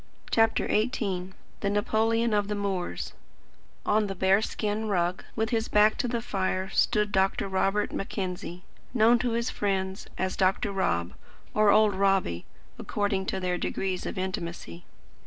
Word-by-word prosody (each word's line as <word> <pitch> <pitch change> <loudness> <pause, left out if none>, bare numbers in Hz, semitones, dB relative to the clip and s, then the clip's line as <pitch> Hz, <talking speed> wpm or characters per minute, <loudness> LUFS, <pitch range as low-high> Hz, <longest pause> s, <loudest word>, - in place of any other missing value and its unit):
CHAPTER 225 0 +3
XVIII 195 -5 -1 0.3
THE 200 - 0
NAPOLEON 220 +2 +1
OF 205 -1 +2
THE 210 - -2
MOORS 190 - -3 0.7
On 210 0 +2
the 195 - -4
bear 190 +2 +3
skin 215 0 -2
rug, 180 -2 0
with 220 0 -1
his 225 -1 0
back 210 +1 +4
to - - +1
the 235 -1 -2
fire, 190 -3 -1
stood 210 -1 +2
Dr. 195 0 +1
Robert 195 +2 +1
Mackenzie, 180 -2 -4 0.3
known 235 +1 +5
to 240 -2 0
his 235 +1 -1
friends 190 -1 -2
as 185 0 -1
"Dr. 195 +2 +1
Rob" 85 - 0 0.4
or 215 -1 +4
"Old 210 0 +5
Robbie," 190 - +1 0.3
according 200 -2 -1
to 190 - -1
their 180 -1 -1
degrees 185 +1 -2
of - - -5
intimacy. 170 - -5
200 Hz, 150 wpm, -27 LUFS, 185-215 Hz, 0.7 s, known